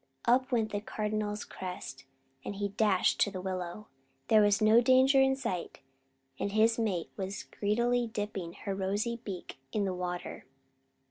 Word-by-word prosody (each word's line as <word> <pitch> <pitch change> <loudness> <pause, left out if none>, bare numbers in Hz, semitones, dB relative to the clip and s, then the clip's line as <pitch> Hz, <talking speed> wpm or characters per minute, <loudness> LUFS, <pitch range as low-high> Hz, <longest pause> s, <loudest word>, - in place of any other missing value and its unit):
Up 255 +2 +3
went 225 -3 +1
the 205 - -2
Cardinal's 210 0 -3
crest, 135 -8 -7 0.4
and 200 - -5
he 200 0 -2
dashed 200 -2 +2
to - - +4
the 190 -2 -6
willow. 185 +2 -4 0.4
There 215 -1 +7
was 205 -1 +4
no 220 +2 +6
danger 260 +2 +5
in 265 0 +4
sight; 230 -10 -4 0.6
and 200 - -2
his 225 +2 +3
mate 190 -7 -1
was 195 0 -4
greedily 235 +4 0
dipping 205 -6 -4
her 200 - -2
rosy 205 +5 -1
beak 185 -8 -7
in 205 -2 0
the 190 - -1
water. 180 -1 -5
205 Hz, 155 wpm, -31 LUFS, 190-230 Hz, 0.6 s, There